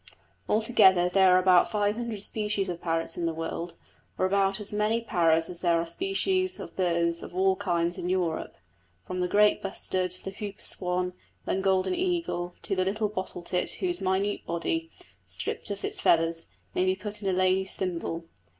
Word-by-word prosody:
Altogether 195 Hz, -5 st, +5 dB
there 185 Hz, 0 st, +5 dB
are -, -, +6 dB
about 185 Hz, -1 st, +5 dB
five 205 Hz, -1 st, +1 dB
hundred 230 Hz, -4 st, -3 dB
species 210 Hz, -3 st, -1 dB
of 175 Hz, -1 st, -5 dB
parrots 165 Hz, -1 st, -1 dB
in 170 Hz, -1 st, 0 dB
the 165 Hz, -, -1 dB
world, 165 Hz, +1 st, -4 dB, 0.4 s
or 185 Hz, -, +2 dB
about 195 Hz, +1 st, +2 dB
as 210 Hz, 0 st, -4 dB
many 210 Hz, +2 st, +1 dB
parrots 165 Hz, -7 st, +2 dB
as 180 Hz, -1 st, -5 dB
there 170 Hz, -2 st, +3 dB
are 165 Hz, -, -1 dB
species 370 Hz, -, 0 dB
of -, -, -8 dB
birds 170 Hz, -2 st, +1 dB
of -, -, -9 dB
all 190 Hz, +1 st, +3 dB
kinds 175 Hz, -2 st, -1 dB
in 180 Hz, 0 st, -3 dB
Europe, 180 Hz, -3 st, -1 dB, 0.5 s
from 185 Hz, -, -4 dB
the 180 Hz, -, +1 dB
great 210 Hz, +2 st, +4 dB
bustard, 185 Hz, -2 st, -2 dB
the 195 Hz, -, -5 dB
hooper 200 Hz, 0 st, -7 dB
swan, 180 Hz, 0 st, 0 dB, 0.3 s
and 190 Hz, -, -1 dB
golden 190 Hz, -, +2 dB
eagle, 345 Hz, -, -1 dB
to 195 Hz, -, -1 dB
the 185 Hz, -, +2 dB
little 210 Hz, +2 st, 0 dB
bottle 185 Hz, -3 st, -5 dB
tit 180 Hz, +1 st, -1 dB
whose 355 Hz, -1 st, -2 dB
minute 190 Hz, +2 st, 0 dB
body, 325 Hz, -, -2 dB, 0.3 s
stript -, -, -5 dB
of 200 Hz, -1 st, -4 dB
its -, -, -2 dB
feathers, 165 Hz, 0 st, +3 dB, 0.3 s
may -, -, +1 dB
be 185 Hz, 0 st, +2 dB
put 205 Hz, +2 st, -6 dB
in 195 Hz, -, -1 dB
a -, -, +2 dB
lady's 185 Hz, +1 st, +2 dB
thimble. 170 Hz, -2 st, -3 dB
190 Hz, 185 wpm, -28 LUFS, 175-210 Hz, 0.5 s, are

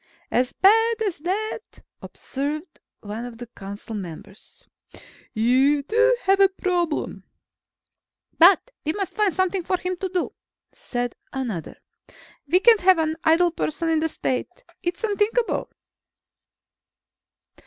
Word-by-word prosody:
"As 250 Hz, +1 st, +1 dB
bad 450 Hz, +4 st, +4 dB
as 390 Hz, -8 st, -2 dB
that?" 425 Hz, +7 st, -4 dB, 0.2 s
observed 300 Hz, +5 st, -5 dB, 0.2 s
one 210 Hz, +3 st, -6 dB
of 245 Hz, -2 st, -8 dB
the 240 Hz, -, -7 dB
council 200 Hz, -1 st, -9 dB
members. 195 Hz, +1 st, -10 dB, 0.6 s
"You 260 Hz, +6 st, +3 dB
do 465 Hz, -, +3 dB
have 390 Hz, +1 st, +3 dB
a 390 Hz, -1 st, +6 dB
problem." 355 Hz, -4 st, -2 dB, 1.2 s
"But 375 Hz, +8 st, +6 dB
we 310 Hz, -, -1 dB
must 395 Hz, 0 st, -4 dB
find 420 Hz, -3 st, +2 dB
something 375 Hz, +1 st, 0 dB
for 370 Hz, -, 0 dB
him 365 Hz, 0 st, -3 dB
to 380 Hz, +1 st, -3 dB
do," 360 Hz, -1 st, -2 dB, 0.4 s
said 245 Hz, -, -4 dB, 0.2 s
another. 235 Hz, -, -5 dB, 0.7 s
"We 360 Hz, +6 st, +3 dB
can't 455 Hz, -1 st, +6 dB
have 370 Hz, 0 st, +5 dB
an 315 Hz, -1 st, 0 dB
idle 340 Hz, +2 st, +4 dB
person 325 Hz, 0 st, -2 dB
in 320 Hz, -1 st, +2 dB
the 320 Hz, +1 st, 0 dB
State. 300 Hz, -, -3 dB, 0.2 s
It's 355 Hz, +1 st, -3 dB
unthinkable." 440 Hz, +2 st, 0 dB
345 Hz, 125 wpm, -23 LUFS, 265-390 Hz, 1.2 s, a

